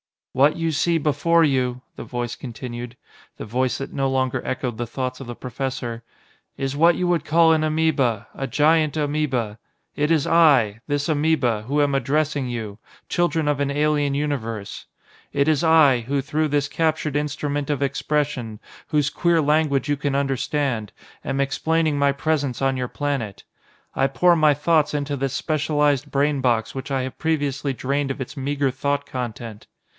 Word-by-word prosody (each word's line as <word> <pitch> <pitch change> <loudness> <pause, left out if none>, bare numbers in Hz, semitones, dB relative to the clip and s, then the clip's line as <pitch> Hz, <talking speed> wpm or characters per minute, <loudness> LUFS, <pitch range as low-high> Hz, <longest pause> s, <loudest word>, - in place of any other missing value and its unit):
"What 140 +4 +4
you 165 -1 -1
see 165 +3 +1
before 160 +3 +2
you," 130 -4 +1 0.2
the - - -7
Voice 120 -1 -4
continued 120 0 -7 0.4
the - - -6
Voice 125 +3 0
that 135 - -6
no 135 -1 0
longer 130 -1 0
echoed 125 -3 -3
the 120 0 -3
thoughts 130 +1 -4
of 135 - -8
the 120 - -6
professor 125 -2 -5 0.5
"is 135 0 -2
what 165 +3 +5
you 180 - -1
would 175 -3 +1
call 165 +1 +5
an 160 -1 +3
amoeba, 140 -9 +1
a 135 - -4
giant 155 +3 +3
amoeba. 140 -8 -1 0.4
It 150 +1 0
is 160 -4 +2
I 135 -11 +4
this 145 +1 -1
amoeba, 145 -8 +1
who 145 +6 0
am 140 -1 +1
addressing 140 +1 0
you 110 -4 -5 0.3
children 170 -3 +1
of 145 -1 0
an 140 -1 0
alien 145 -1 +1
universe. 115 -8 -3 0.5
It 140 +2 +2
is 155 +1 +2
I, 155 -6 +5
who 140 0 0
through 155 +3 -1
this 145 0 0
captured 155 -1 0
instrument 145 -1 -2
of 145 -1 0
expression, 140 -5 -2 0.3
whose 150 -3 +1
queer 170 +1 +2
language 150 -2 +1
you 145 - +1
can 140 -1 -1
understand, 135 -4 -1 0.3
am 135 +1 -1
explaining 155 +2 0
my 140 0 +3
presence 140 -3 -1
on 135 -1 +1
your 125 -1 -2
planet. 135 -8 -3 0.5
I 135 - +3
pour 175 +5 +3
my 155 -2 +5
thoughts 150 +2 +2
into 145 0 -2
this 135 -1 -2
specialised 145 -1 0
brain 145 0 +1
box 115 -3 +1
which 135 +1 -6
I 135 -2 0
have 130 - -7
previously 145 -3 -1
drained 140 +2 -1
of 135 - -6
its 130 +3 -7
meager 140 0 0
thought 140 +2 -1
content." 115 -3 -6
140 Hz, 170 wpm, -22 LUFS, 130-150 Hz, 0.5 s, what